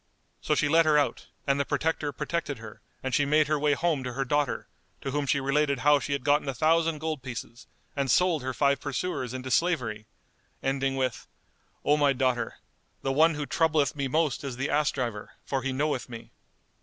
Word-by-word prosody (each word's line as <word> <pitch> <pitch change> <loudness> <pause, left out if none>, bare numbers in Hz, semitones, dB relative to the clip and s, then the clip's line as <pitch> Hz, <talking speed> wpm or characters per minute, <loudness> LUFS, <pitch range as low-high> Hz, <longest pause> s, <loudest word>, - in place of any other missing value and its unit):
So 150 - +1
she 145 - +2
let 165 +2 +4
her 150 -1 +5
out, 145 - 0 0.2
and 140 -1 +1
the - - +3
Protector 150 0 -1
protected 150 0 -3
her 110 -1 -11 0.2
and 130 -1 -3
she 145 - +3
made 150 +1 +3
her 155 -1 +1
way 150 0 +3
home 155 -3 0
to 125 -1 -4
her 135 +2 -1
daughter, 145 -1 0 0.3
to 135 - -3
whom 145 0 -1
she 140 - +2
related 140 +1 +1
how 145 0 +5
she 140 - -3
had 140 -2 -2
gotten 145 +1 +2
a 135 - -3
thousand 165 +3 +2
gold 155 -2 -3
pieces 120 -1 -8 0.3
and 140 -2 -1
sold 175 +2 +3
her 130 +1 -2
five 140 +1 +1
pursuers 140 -3 -3
into 130 0 -5
slavery, 120 -12 0 0.6
ending 135 0 0
with, 130 -1 -2 0.6
"O 145 +1 +4
my 145 -2 +4
daughter, 130 -2 0 0.5
the 135 - 0
one 160 +3 +4
who 145 0 -3
troubleth 155 -2 +1
me 140 -2 -1
most 155 0 0
is 135 -3 -5
the 135 +3 -2
ass 150 0 +3
driver, 115 -6 -4
for 135 -1 -1
he 135 0 -2
knoweth 135 -1 -1
me." 115 -1 -9
140 Hz, 205 wpm, -27 LUFS, 130-150 Hz, 0.6 s, her